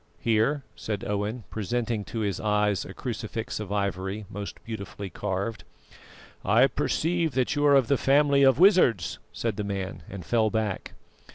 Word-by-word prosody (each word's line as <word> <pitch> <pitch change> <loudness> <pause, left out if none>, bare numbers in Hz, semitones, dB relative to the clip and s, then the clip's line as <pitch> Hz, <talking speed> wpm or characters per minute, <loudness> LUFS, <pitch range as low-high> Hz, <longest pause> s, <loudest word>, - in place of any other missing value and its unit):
"Here," 115 +6 +1
said 105 -2 -4
Owen, 105 +3 -2
presenting 115 0 -2
to 115 - -4
his 100 -4 -1
eyes 105 -2 +1
a 95 - -8
crucifix 115 -2 -4
of 105 -2 -6
ivory, 100 0 -2
most 100 0 -6
beautifully 100 -3 -6
carved. 100 +4 -3 0.8
"I 110 +7 +5
perceive 165 +2 0
that 130 +3 +1
you 145 - 0
are 140 - +6
of 135 -4 +4
the 140 - +3
family 140 0 +4
of 135 -2 +6
wizards," 175 - +4
said 115 -4 -3
the 105 - -1
man, 95 -3 -4
and 95 -3 -8
fell 110 +1 +2
back. 110 -3 -2
110 Hz, 160 wpm, -27 LUFS, 100-125 Hz, 0.8 s, are